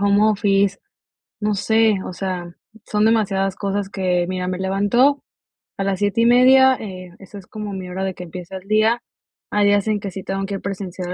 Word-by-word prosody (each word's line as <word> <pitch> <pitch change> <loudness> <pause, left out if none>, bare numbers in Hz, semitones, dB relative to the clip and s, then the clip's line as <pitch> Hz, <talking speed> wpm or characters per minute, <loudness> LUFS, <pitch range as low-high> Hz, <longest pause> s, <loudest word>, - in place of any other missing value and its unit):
home 200 +1 +3
office, 200 -1 +1 0.6
no 210 0 0
sé, 220 +1 +2
o - - -6
sea, 180 -2 -4 0.4
son 210 0 +1
demasiadas 195 -4 +1
cosas 200 0 -3
que, 180 -3 0
mira, 185 0 -3
me 185 0 -2
levanto 205 +9 +2 0.5
a 195 - -1
las 195 -1 -1
7 205 +2 +1
y - - +4
media, 260 +2 +6
eh, 185 -4 -9
esa 195 +1 -12
es 190 - -15
como 210 -2 -6
mi 185 -1 -6
hora 190 +1 -4
de 190 -1 -3
que 180 - -8
empieza 180 +2 -8
el 190 +1 -13
día. 220 +3 +2 0.5
Hay 205 0 +3
días 205 0 +2
en 215 -1 +1
que 200 - -5
sí 190 +1 -7
tengo 195 +1 -3
que 200 - -4
ir 195 - -6
presencial 185 -2 -5
195 Hz, 205 wpm, -20 LUFS, 190-210 Hz, 0.6 s, media